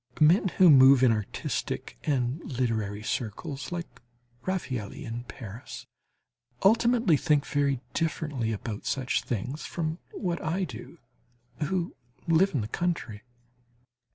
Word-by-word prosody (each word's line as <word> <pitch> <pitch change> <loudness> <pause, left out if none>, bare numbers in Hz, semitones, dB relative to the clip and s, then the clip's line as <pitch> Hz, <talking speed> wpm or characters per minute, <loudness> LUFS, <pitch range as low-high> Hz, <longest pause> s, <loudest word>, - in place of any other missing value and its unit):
Men 170 +6 +5
who 180 -3 +8
move 135 -1 +8
in 125 - +6
artistic 105 - -3
and 130 0 0
literary 110 -5 -2
circles, 125 - -4
like 175 -7 -6 0.5
Raffaëlli 135 - -3
in 120 -1 -5
Paris, 115 -1 -9 0.8
ultimately 230 -3 +5
think 150 0 +2
very 140 -3 0
differently 150 -7 -1
about 105 0 -5
such 130 -2 0
things 125 +6 -4
from 165 0 -3
what 175 -3 -3
I 170 +5 0
do, 130 -11 -8 0.7
who 180 +1 -2 0.3
live 170 +2 +4
in 130 - +1
the 105 - -3
country. 130 -8 -2
140 Hz, 120 wpm, -28 LUFS, 115-170 Hz, 0.8 s, who